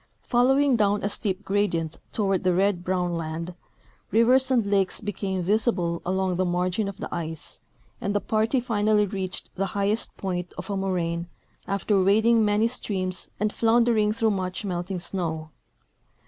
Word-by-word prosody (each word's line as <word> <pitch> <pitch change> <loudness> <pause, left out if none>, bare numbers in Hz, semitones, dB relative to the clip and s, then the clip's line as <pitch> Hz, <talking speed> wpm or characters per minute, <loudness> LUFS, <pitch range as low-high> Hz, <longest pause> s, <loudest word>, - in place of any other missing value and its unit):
Following 265 +2 +3
down 205 -2 +2
a 200 - +1
steep 200 -2 -2
gradient 170 -6 0
toAvard 195 -4 0
the 185 -1 +2
red 190 -1 +1
broAvn 180 -1 0
land, 165 +2 -4 0.6
livers 250 +4 +4
and 245 -5 +3
lakes 195 -2 +1
became 195 -3 -3
visible 185 -4 +1
along 185 0 0
the 185 - +2
margin 180 +3 0
of 200 -1 -6
the - - -6
ice, 160 -2 -5 0.4
and 200 +1 -1
the - - +3
party 220 +5 +1
finally 215 -3 +2
reached 190 -2 -3
the 195 +1 -1
highest 205 +3 0
point 180 -2 -4
of - - -5
a - - -1
moraine 175 -3 -1 0.4
after 200 0 +1
wading 220 +4 +4
many 210 +2 +3
streams 185 -6 -3
and 210 0 0
floundering 230 -2 +3
through 225 0 +1
much 185 +1 -3
melting 180 0 -3
snow. 160 -3 -3
195 Hz, 155 wpm, -25 LUFS, 180-215 Hz, 0.6 s, livers